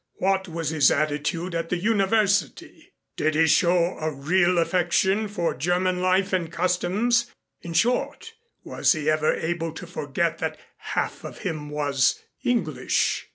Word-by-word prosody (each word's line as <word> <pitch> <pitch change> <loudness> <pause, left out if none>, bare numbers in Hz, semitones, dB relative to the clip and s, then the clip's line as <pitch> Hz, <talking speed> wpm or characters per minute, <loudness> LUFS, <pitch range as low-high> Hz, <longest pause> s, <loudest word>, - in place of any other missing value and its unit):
What 190 0 0
was 165 -3 -3
his 155 -3 +4
attitude 155 +4 -1
at 165 0 -3
the 180 - 0
University? 200 - 0 0.3
Did 155 0 0
he 160 +1 +4
show 170 +2 +2
a 155 0 -2
real 175 +6 +1
affection 185 +4 +1
for 175 -5 -2
German 180 +5 0
life 185 +1 +1
and 170 -3 -1
customs? 185 +7 +1 0.3
In 170 - -7
short 250 - 0 0.3
was - - +2
he 155 -2 0
ever 155 0 +2
able 165 0 -3
to 170 - -8
forget 165 0 -2
that 160 -2 -3 0.4
half - - -2
of - - -8
him 155 -6 -4
was 145 -3 +1 0.2
English?" 160 - 0
175 Hz, 145 wpm, -24 LUFS, 155-190 Hz, 0.4 s, his